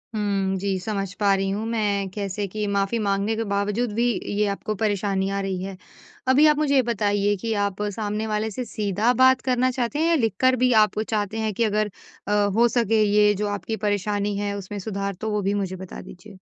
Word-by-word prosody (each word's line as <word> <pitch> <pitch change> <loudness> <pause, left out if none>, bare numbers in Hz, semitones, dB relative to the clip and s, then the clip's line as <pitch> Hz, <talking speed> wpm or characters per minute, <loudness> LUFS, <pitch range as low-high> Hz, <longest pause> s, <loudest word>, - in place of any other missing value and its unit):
हुँ, 195 -2 0
जी। 195 0 -1
समझ 195 0 -3
पा 200 -2 +4
रही 195 0 -1
हूँ 210 +3 -2
मैं, 205 -4 0
कैसे 200 +1 -3
कि 210 +2 -3
माफी 200 +3 0
माँगने 200 +1 0
के 225 - -1
बावजूद 205 +3 -1
भी 235 +2 +1 0.3
ये 210 +1 +2
आपको 200 +2 -3
परेशानी 200 -2 0
आ 200 0 -2
रही 190 -2 -3
है। 195 -1 -6 0.5
अभी 265 +4 +5
आप 300 -1 +4
मुझे 295 -2 +2
ये 265 - +6
बताइए 205 -3 +1
कि 225 -1 -1
आप 200 0 -4
सामने 215 0 -2
वाले 215 +1 -1
से 250 +5 -4
सीधा 210 +1 0
बात 260 0 +5
करना 255 0 +1
चाहते 250 +3 -2
हैं? 325 - +2
या 335 - +4
लिखकर 255 - +2
भी 250 - +4
आप 215 0 -2
चाहते 215 -1 -2
हैं 220 -1 -1
कि 230 - 0
अगर 210 -1 0 0.4
अ, - - -1 0.2
हो 235 +1 +5
सके 225 -2 +2
ये 210 0 +4
जो 210 +2 -2
आपकी 205 +1 -3
परेशानी 205 0 0
है 205 0 -2
उसमें 200 +1 -6
सुधार? 200 0 -3
तो 220 +4 -5
वो 210 - 0
भी 200 +1 0
मुझे 195 -2 -2
बता 185 -1 -8
दीजिए। 190 +2 -13
210 Hz, 215 wpm, -24 LUFS, 200-225 Hz, 0.5 s, ये